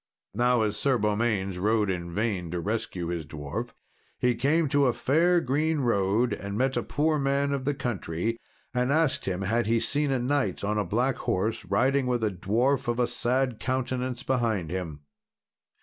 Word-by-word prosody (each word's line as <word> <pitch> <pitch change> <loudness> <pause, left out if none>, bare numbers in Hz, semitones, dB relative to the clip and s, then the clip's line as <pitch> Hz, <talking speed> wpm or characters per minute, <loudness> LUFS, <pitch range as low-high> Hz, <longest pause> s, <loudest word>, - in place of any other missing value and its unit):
Now 120 +1 +3
as 105 -1 -1
Sir 135 +2 +2
Beaumains 105 -3 0
rode 105 0 +2
in 85 -2 -4
vain 100 -3 -1
to 90 +1 -3
rescue 95 -3 -3
his 85 -2 -2
dwarf, 75 -2 -6 0.4
he 125 0 +2
came 145 +7 +2
to 140 0 +3
a 125 - +2
fair 170 +8 +3
green 155 +2 0
road 115 0 +2
and 100 +1 -5
met 130 +2 +1
a - - +1
poor 155 +1 0
man 140 +1 +1
of 135 -2 -3
the 145 0 0
country, 115 -2 -2 0.3
and 125 +1 +1
asked 155 -1 +1
him 95 0 -2
had 115 +4 +1
he 115 +1 +3
seen 145 +5 0
a 135 - +2
knight 125 -7 0
on 105 +1 0
a - - +1
black 120 +8 0
horse, 110 +5 -1
riding 135 0 +2
with 120 -2 0
a 110 - +1
dwarf 115 +10 0
of 120 +1 0
a 125 - +4
sad 125 0 0
countenance 130 0 -2
behind 115 - 0
him. 85 -6 -4
120 Hz, 180 wpm, -27 LUFS, 100-135 Hz, 0.4 s, a